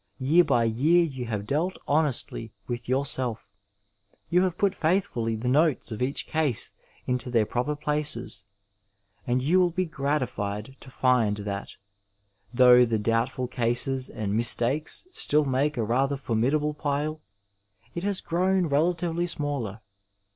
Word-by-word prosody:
Year 155 +7 +4
by 135 -7 +2
year 145 +10 +3
you 135 -6 -4
have 105 -3 -3
dealt 160 - -1
honestly 140 -6 0 0.2
with 120 0 -5
yourself; 130 -5 -1 0.8
you 180 +1 +4
have 185 -2 0
put 200 -2 +2
faithfully 155 - 0
the 115 +3 -4
notes 145 0 +2
of 110 - -5
each 130 +3 -1
case 155 -7 -1 0.3
into 125 0 -1
their 115 -3 +2
proper 125 +7 -2
places, 150 -7 -1 0.8
and 125 +1 +1
you 170 +7 +3
will 180 -1 +4
be 185 +2 -1
gratified 130 - -3
to 135 - -13
find 125 -5 +2
that, 100 -1 -5 0.8
though 125 0 +7
the 115 -2 +1
doubtful 115 +4 -1
cases 125 +2 0
and 105 -1 -3
mis 115 +1 +3
takes 145 - 0
still 150 - +2
make 140 +2 0
a 115 - 0
rather 135 +5 0
formidable 135 +5 0
pile, 150 +1 -2 0.7
it 170 - -4
has 200 -1 -1
grown 185 +2 +1
relatively 170 +3 0
smaller. 140 - -2
135 Hz, 140 wpm, -26 LUFS, 120-155 Hz, 0.8 s, though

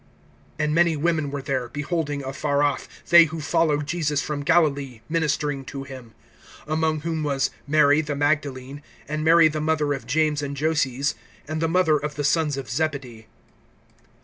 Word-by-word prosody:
(55)And 150 0 +1
many 165 0 +3
women 155 -1 0
were 140 -1 -5
there, 130 -3 -2
beholding 145 -1 -3
afar 140 +2 -1
off, 145 -3 -1 0.2
they 170 -1 +9
who 160 0 -6
followed 150 -1 +1
Jesus 150 -2 -1
from 145 -1 -3
Galilee, 145 -6 +1
ministering 150 -3 -1
to 135 0 -6
him; 130 -5 -11 0.5
(56)among 155 0 0
whom 165 -1 -2
was 140 -3 0 0.2
Mary 150 0 +4
the 150 -2 -4
Magdalene, 145 -2 -1 0.3
and 155 +1 -3
Mary 165 0 +6
the 155 0 -3
mother 155 -2 +1
of 135 - -7
James 150 +1 +1
and 140 -1 -5
Joses, 140 -3 0 0.3
and 155 +1 -3
the 165 - +1
mother 165 -3 +3
of 150 +1 -5
the 145 - -3
sons 150 -1 +1
of 135 -3 -5
Zebedee. 125 -4 -3
150 Hz, 165 wpm, -24 LUFS, 140-155 Hz, 0.5 s, they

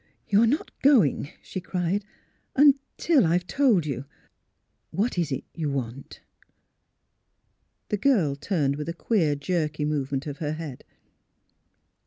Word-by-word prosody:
'' - - -41
You 205 +2 +6
are 230 - +5
not 285 +7 0
going," 220 - +4
she 185 - -6
cried, 185 +2 -1 0.3
" - - -43
until 280 +1 +4
I 165 -1 +2
have 175 0 +1
told 225 - +3
you.... 135 -2 -4 0.8
What 220 +6 -1
is 160 -4 -1
it 135 - -2
you 155 -3 -2
want? 135 -1 -5 0.8
" 85 +10 -48
The 210 - 0
girl 195 - +2
turned 140 -3 0
with 150 +2 -4
a - - -2
queer, 170 -5 +1
jerky 150 0 -1
movement 140 -2 -2
of 145 -2 -6
her 150 -1 -2
head. 155 -5 -7
165 Hz, 150 wpm, -26 LUFS, 145-205 Hz, 0.8 s, You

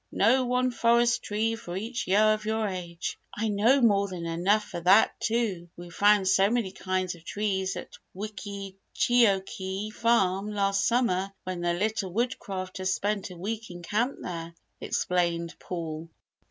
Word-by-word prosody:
"Know 260 0 +3
one 250 +1 +1
forest 235 0 +3
tree 220 +2 -1
for 205 -6 -6
each 230 +4 -4
year 215 +3 +5
of 215 0 -4
your 220 0 0
age." 175 -3 -5 0.2
"I 220 +1 0
know 225 +7 +4
more 200 -4 +4
than 180 -3 -6
enough 180 +6 +2
for 175 - -6
that 185 +5 +5
too; 215 -7 -1
we 175 0 -10
found 205 +1 +4
so 195 +1 +4
many 230 -5 0
kinds 185 -1 -2
of 170 -2 -15
trees 195 -1 -1
at - - -9 0.2
Wickeecheokee 200 0 -1
Farm 205 -4 +2
last 200 0 +1
summer 200 -6 +1
when 185 -1 -4
the 175 0 +1
Little 205 0 -1
Woodcrafters 190 -4 -2
spent 200 0 -1
a 180 - -10
week 220 +5 -4
in 175 -1 -9
camp 230 +9 0
there," 170 -1 -6 0.2
explained 170 -2 -1
Paul. 165 -2 -5
200 Hz, 155 wpm, -27 LUFS, 185-220 Hz, 0.2 s, year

